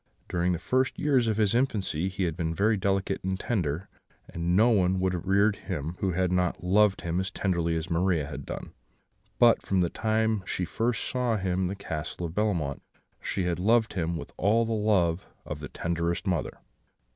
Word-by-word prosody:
During 90 +1 0
the - - 0
first 130 +9 0
years 135 -5 +2
of 110 -2 0
his 105 -2 +2
infancy 100 - 0
he 95 0 -3
had 85 -3 -1
been 80 -1 -2
very 105 +4 +3
delicate 95 -1 -1
and 95 0 -2
tender, 90 -6 -1 0.4
and 85 +1 -1
no 115 +5 +5
one 95 -3 +2
would 95 0 +1
have 90 +1 -4
reared 100 +2 +3
him 85 -3 -4
who 95 -2 0
had 90 0 +1
not 90 -1 0
loved 100 +2 +3
him 85 +1 -1
as 95 0 -1
tenderly 85 -4 0
as 80 0 -2
Maria 85 -2 +1
had 75 - -7
done; - - -7 0.6
but 120 -1 +5
from 95 -2 +1
the 85 - 0
time 110 0 +1
that 95 - -12
she 90 - -1
first 115 +7 -1
saw 125 -3 0
him 95 -2 -1
in 95 - +1
the 95 - -3
Castle 85 -3 -5
of 80 - -5
Bellemont, 85 -9 -1 0.4
she 95 - -2
had 90 -1 -1
loved 110 +4 +3
him 85 -2 -1
with - - -8
all 110 +4 +3
the 115 - -3
love 95 -5 +1 0.2
of 75 - -5
the 75 -2 -7
tenderest 85 +2 -2
mother. 90 -5 -1
95 Hz, 205 wpm, -28 LUFS, 85-105 Hz, 0.6 s, no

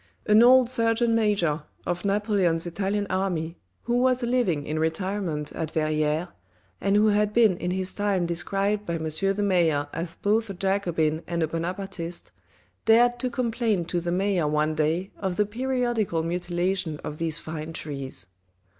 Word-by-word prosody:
An 215 +1 +6
old 255 +1 +7
Surgeon 230 -1 +1
Major 200 -9 +1 0.2
of 175 0 -2
Napoleon's 200 -5 +1
Italian 200 +4 -1
Army, 180 -3 -2 0.2
who 240 0 +1
was 255 0 +2
living 235 - +1
in 155 +1 -2
retirement 160 -2 -2
at 160 - -4
Verrieres, 155 +1 0 0.5
and 200 0 +2
who 215 +1 +5
had 210 0 +2
been 220 -5 +5
in 180 - -3
his 185 +1 -2
time 200 -3 0
described 195 +5 -1
by 170 -4 -3
M. 160 - -4
the 195 +6 0
mayor 165 -7 +2
as 165 +1 -4
both 220 +2 +1
a 195 - -5
Jacobin 175 -5 0
and 170 -1 -1
a - - +1
Bonapartiste, 175 +1 -4 0.5
dared 240 +2 +5
to 255 - -1
complain 230 -6 0
to 175 +1 -2
the 175 0 -2
mayor 185 -3 +1
one 150 +1 +1
day 160 +5 0
of 190 -2 -2
the 210 - +2
periodical 240 -6 -1
mutilation 175 -1 -1
of 150 - -6
these 165 -1 0
fine 160 -1 -6
trees. 140 -5 -5
185 Hz, 160 wpm, -26 LUFS, 165-210 Hz, 0.5 s, old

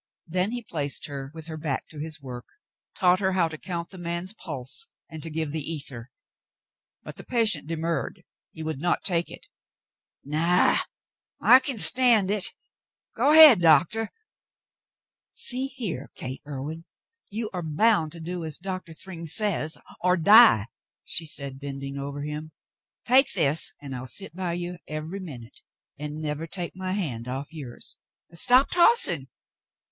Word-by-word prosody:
Then 180 +3 0
he 240 +1 -5
placed 145 -8 -3
her 135 -2 -6
with 160 -1 -9
her 160 -1 -7
back 150 -4 -3
to 155 - -11
his 155 -1 -4
work, 125 -3 -9 0.5
taught 180 0 +3
her 190 -1 0
how 180 -3 +2
to 160 - -7
count 170 -2 -5
the 190 - -10
man's 175 +3 -3
pulse 160 - -4 0.2
and 160 -1 -8
to 165 - -5
give 160 -1 -3
the 155 +1 -2
ether; 140 -6 -5 0.9
but - - -10
the - - -8
patient 220 -12 0
demurred. 165 +2 -3 0.3
He 160 - -8
would 155 -3 -3
not 175 +1 0
take 170 -3 0
it. - - -10 0.8
"Naw, 165 +5 +2 0.6
I 255 - +7
kin 260 -2 -3
stand 230 -4 +5
hit. 205 -2 +1 0.6
Go 290 - +3
ahead. 305 - +10
Doctor." 170 +8 +3 1.2
"See 260 +2 -1
here. 220 - -5
Gate 130 +1 -6
Irwin. 150 +4 -6 0.4
You 220 +1 -2
are 180 - -3
bound 160 +1 +2
to 170 - -11
do 175 +1 -5
as 155 -2 -2
Doctor 185 -2 -6
Thryng 170 -1 -8
says 165 -3 +2 0.3
or 180 0 +3
die," 205 - +7 0.4
she 160 - -1
said, 140 -3 -4
bending 140 0 -6
over 140 +1 -5
him. 150 +1 -6 0.5
"Take 260 +3 +5
this, 155 -3 +2
and 140 -2 -7
I'll 125 +1 -7
sit 165 - -6
by 180 -2 -3
you 175 0 -5
every 155 +5 -5
minute 130 -10 -10 0.4
and 150 0 -5
never 155 +1 -4
take 175 +1 -6
my 185 0 -4
hand 130 - -3
off 135 +5 -6
yours. 135 -7 -9 0.4
Stop 250 +10 +4
tossing. 340 - +4
165 Hz, 155 wpm, -25 LUFS, 150-190 Hz, 1.2 s, ahead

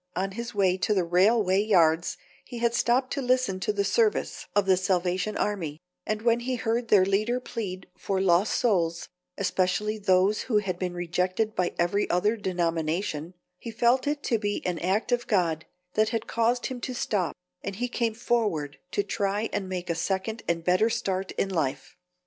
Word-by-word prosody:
On 195 +2 -1
his 235 +2 -6
way 190 -2 +3
to 210 +3 +1
the 185 - +2
railway 190 +3 +3
yards 170 -5 +3 0.3
he 245 - -9
had 235 0 +1
stopped 245 +2 +1
to 280 - -2
listen 250 -6 +1
to 190 - 0
the 200 -1 0
service 210 +2 0
of 205 -1 +3
the 190 -1 +5
Salvation 185 +2 0
Army, 165 -8 -2 0.3
and 215 0 -2
when 235 0 +3
he 250 +2 -2
heard 230 0 -1
their 200 -4 +5
leader 215 +6 +1
plead 200 -7 -5
for 195 -1 -1
lost 190 +2 +3
souls, 170 -7 +1 0.3
especially 200 +3 0
those 195 +1 +3
who 215 - +3
had 190 -4 -1
been 180 -1 -3
rejected 180 +5 -1
by 180 -3 -1
every 175 +4 +1
other 205 +6 +2
denomination, 170 -3 -2 0.2
he - - -7
felt 235 +4 +2
it 290 0 -1
to 230 - +1
be 205 -1 -2
an 180 -2 -1
act 195 +7 0
of 245 0 0
God 170 -6 +1 0.3
that 215 0 +2
had 225 -2 -2
caused 235 +1 0
him 255 -2 -4
to 255 - -4
stop, 200 -7 -1 0.3
and 200 - -5
he 245 +5 -2
came 235 -2 -1
forward 210 - -1
to 205 - +1
try 200 +1 -1
and 190 -2 -2
make 180 -1 -4
a - - +2
second 190 +6 -2
and 170 -1 0
better 185 +6 +3
start 195 -4 -2
in - - 0
life. 140 -7 -2
200 Hz, 185 wpm, -27 LUFS, 180-225 Hz, 0.3 s, the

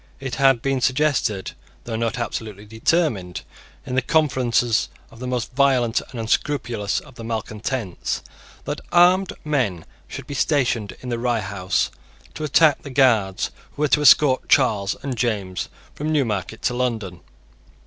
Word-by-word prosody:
It 130 -2 -5
had 135 -4 +4
been 135 -1 0
suggested, 130 -7 +1 0.3
though 115 - -5
not 115 +1 -1
absolutely 110 -3 -5
determined, 110 - 0 0.4
in 130 - -5
the 130 - +3
conferences 125 -6 +1 0.2
of 115 - -15
the 125 - -5
most 125 -1 -2
violent 130 -4 +3
and 125 - -7
unscrupulous 115 -3 -1
of 145 - -16
the 115 - -10
malecontents, 110 -2 -3 0.4
that 145 +1 -4
armed 180 +2 +5
men 120 - 0 0.2
should - - -8
be - - -7
stationed 125 -7 0
in 125 - -6
the 120 -1 -2
Rye 120 -2 0
House 95 -2 -1 0.4
to - - -6
attack 150 0 +4
the 140 - -9
Guards 115 -8 +2 0.2
who 150 - -2
were - - +4
to 150 - +3
escort 140 -2 +5
Charles 105 -7 +3
and 135 -2 -3
James 105 -6 -2 0.2
from 155 +2 -3
Newmarket 110 - -1
to - - +1
London. 115 -8 -2
120 Hz, 150 wpm, -22 LUFS, 110-140 Hz, 0.4 s, armed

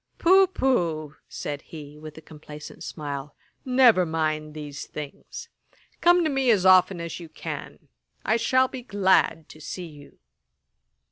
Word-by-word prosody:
'Poh, 380 +2 +5
poh! 170 - -1 0.2
(said 145 -1 -5
he, 150 -2 -11
with 155 0 -11
a - - -10
complacent 150 -1 -11
smile,) 145 -2 -6 0.3
never 250 -7 +5
mind 155 -2 -2
these 145 -2 -7
things. 150 -2 -8 0.5
Come 350 0 +5
to 315 - +1
me 270 -2 +1
as 200 -5 +3
often 185 -1 +5
as 170 +1 -6
you 170 -2 -10
can. - - -8 0.4
I 220 - +2
shall 255 +3 +3
be 255 -1 -8
glad 190 -7 +1
to 155 - -14
see 175 +4 -6
you.' 145 -3 -14
165 Hz, 145 wpm, -25 LUFS, 150-240 Hz, 0.5 s, Poh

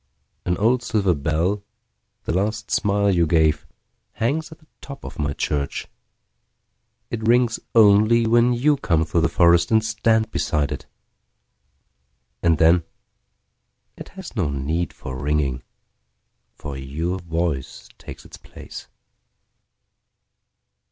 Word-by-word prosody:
An 90 0 0
old 120 +4 +2
silver 100 -6 +1
bell, 80 +7 -1 0.6
the - - -2
last 110 +5 -2
smile 100 0 +2
you 85 -3 +2
gave, 80 -1 +2 0.5
Hangs 155 +8 -2
at 160 - -11
the 155 - -26 0.2
top 140 -1 -10
of - - -9
my 75 -1 -1
church.It 70 -1 -3 1.4
rings 120 -1 +3 0.2
only 110 +2 +5
when 120 +2 +4
you 140 +5 +2
come 80 - +1
through 80 +1 0
the - - +3
forestAnd 85 +6 +4
stand 110 0 +1
beside 75 -7 -1
it. 75 - -6 1.5
And 85 -2 +3
then, 85 +2 +4 1.1
it - - -10
has - - -9
no - - 0
need 70 +4 -2
for 65 - -8
ringing, 70 -3 -1 0.9
For 75 -2 -7
your 80 +8 -3
voice 85 -5 -3
takes - - -11
its - - -12
place. - - -11
90 Hz, 120 wpm, -22 LUFS, 80-110 Hz, 1.5 s, only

